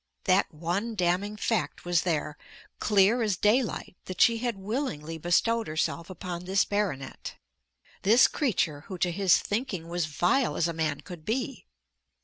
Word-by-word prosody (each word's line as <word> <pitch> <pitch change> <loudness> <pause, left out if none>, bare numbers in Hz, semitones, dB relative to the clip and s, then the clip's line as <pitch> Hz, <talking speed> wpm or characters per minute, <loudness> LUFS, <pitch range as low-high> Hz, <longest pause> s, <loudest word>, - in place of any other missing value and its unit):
That 190 0 +2
one 180 +9 -3
damning 185 +3 0
fact 225 -2 -1
was 175 -1 +2
there, 155 -3 -1 0.4
clear 210 +3 +3
as 210 -5 0
daylight, 215 -2 +1
that 185 - -7
she 230 -1 +5
had 240 -3 -2
willingly 190 - -4
bestowed 225 +8 +1
herself 165 +2 -2
upon 180 -1 -6
this 195 +2 +2
baronet, 185 -11 -3 0.7
this 225 +5 +6
creature 165 - -1
who 190 - -6
to 175 +1 +1
his 190 0 +4
thinking 205 -7 -3
was 175 -2 -1
vile 175 - +1
as 170 - +1
a 170 - -3
man 155 -3 -2
could 175 -1 -10
be. 250 - -3
185 Hz, 150 wpm, -28 LUFS, 170-220 Hz, 0.7 s, this